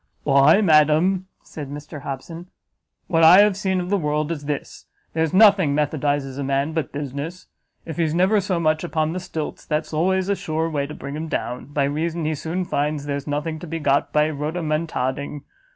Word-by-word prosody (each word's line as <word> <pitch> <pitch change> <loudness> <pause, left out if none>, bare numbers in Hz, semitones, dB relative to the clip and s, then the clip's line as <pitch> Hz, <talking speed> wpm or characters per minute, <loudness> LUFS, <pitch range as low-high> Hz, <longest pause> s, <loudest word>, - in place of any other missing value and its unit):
"Why, 140 +7 +5
madam," 165 +2 +3 0.2
said 145 -3 -8
Mr 145 +1 -8
Hobson, 160 +6 -7 0.6
"what 165 -3 +2
I 175 +5 +9
have 205 -2 +4
seen 190 -2 -1
of 180 +1 -4
the 200 - +2
world 150 0 -1
is 145 -3 -5
this; 145 -1 -5 0.3
there's 160 -1 0
nothing 190 -7 +5
methodizes 145 -2 -1
a - - -2
man 140 +3 0
but 160 -5 -2
business. 145 +5 -5 0.4
If 160 -3 -7
he's 165 -2 0
never 190 +4 +3
so 185 -2 -1
much 155 -1 +1
upon 160 -2 -1
the 185 - -3
stilts, 160 -4 -5
that's 155 +1 -2
always 185 +4 +1
a 200 - +1
sure 160 -1 -2
way 140 -2 -1
to 150 - -8
bring 140 +1 -7
him 160 +2 -4
down, 125 -5 -3
by 145 0 -1
reason 160 +3 -1
he 155 - 0
soon 165 +5 -3
finds 145 -1 -1
there's 140 0 -4
nothing 150 +2 -2
to 175 - -8
be 165 +1 -3
got 145 -3 +1
by 150 0 +3
rhodomontading. 150 -3 -2
155 Hz, 190 wpm, -22 LUFS, 145-170 Hz, 0.6 s, I